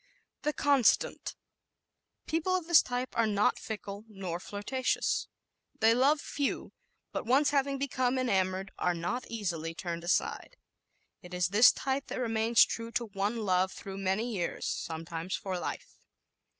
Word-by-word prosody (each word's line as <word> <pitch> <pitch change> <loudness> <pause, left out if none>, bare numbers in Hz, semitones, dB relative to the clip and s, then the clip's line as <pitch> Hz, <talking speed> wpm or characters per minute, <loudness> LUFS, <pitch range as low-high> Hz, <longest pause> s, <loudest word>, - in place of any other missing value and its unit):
The 300 - 0
Constant 280 -6 +3 1.0
¶ - - -55
People 330 +3 0
of 365 -3 -1
this 340 -1 +7
type 250 0 -4
are 230 -1 +3
not 205 -1 +2
fickle 205 -2 -6
nor 190 -4 -5
flirtatious. 205 +8 -1 0.5
They 225 +1 +5
love 275 +5 +4
few; 285 -1 -3 0.4
but - - -4
once 275 +4 +4
having 275 -1 +1
become 260 -2 0
enamored 195 -5 0
are 180 -1 +1
not 205 +10 -3
easily 170 -7 -3
turned 170 -1 -4
aside. 190 - -1 0.6
It 180 0 -9
is 180 0 +1
this 210 +5 +7
type 270 +1 -2
that - - -4
remains 225 -1 +4
true 230 0 -5
to 240 +1 0
one 205 +3 -1
love 185 0 +2
through 195 0 -8
many 195 +5 0
years, 175 -3 -2
sometimes 165 +2 -3
for 185 -2 -4
life. - - -6
220 Hz, 150 wpm, -30 LUFS, 185-255 Hz, 1.0 s, this